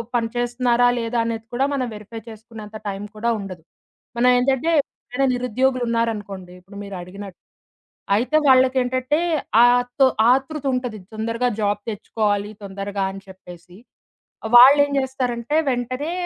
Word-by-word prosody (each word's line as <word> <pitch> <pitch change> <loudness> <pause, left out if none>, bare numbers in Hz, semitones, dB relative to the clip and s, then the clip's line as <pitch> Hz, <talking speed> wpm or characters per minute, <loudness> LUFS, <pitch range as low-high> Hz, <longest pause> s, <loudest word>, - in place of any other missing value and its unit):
పని 230 -1 0
చేస్తున్నారా 245 0 +1
లేదా 230 +1 -2
అనేది 225 -1 -4
కూడా 260 +3 +1
మనం 255 -3 -1
వెరిఫై 215 +2 -9
చేసుకునేంత 220 -1 -10
టైం 195 0 -4
కూడా 230 +2 -1
ఉండదు. 185 -4 -8 0.5
మనం 250 +1 +4
ఏంటంటే 265 +4 +1
ఎవరైనా 270 +1 -4
నిరుద్యోగులు 250 +1 0
ఉన్నారనుకోండి 205 -6 -3
ఇప్పుడు 195 +3 -14
మీరడిగినట్టు 195 0 -9 0.8
అయితే 255 +8 +1
వాళ్ళకేంటంటే 255 +1 +3 0.4
ఆ - - +8 0.3
తొ 270 - +7 0.3
ఆతృతుంటది 260 -5 -1
తొందరగా 230 +3 -1
జాబ్ 205 0 0
తెచ్చుకోవాలి. 205 -1 -2
తొందరగా 195 0 -4
అని 195 - -9
చెప్పేసి. 180 -1 -14 0.8
వాళ్ళేం 285 +4 +8
జేస్తారంటే 255 0 -2
వెంటనే 255 +5 -3
235 Hz, 120 wpm, -21 LUFS, 205-255 Hz, 0.8 s, ఆ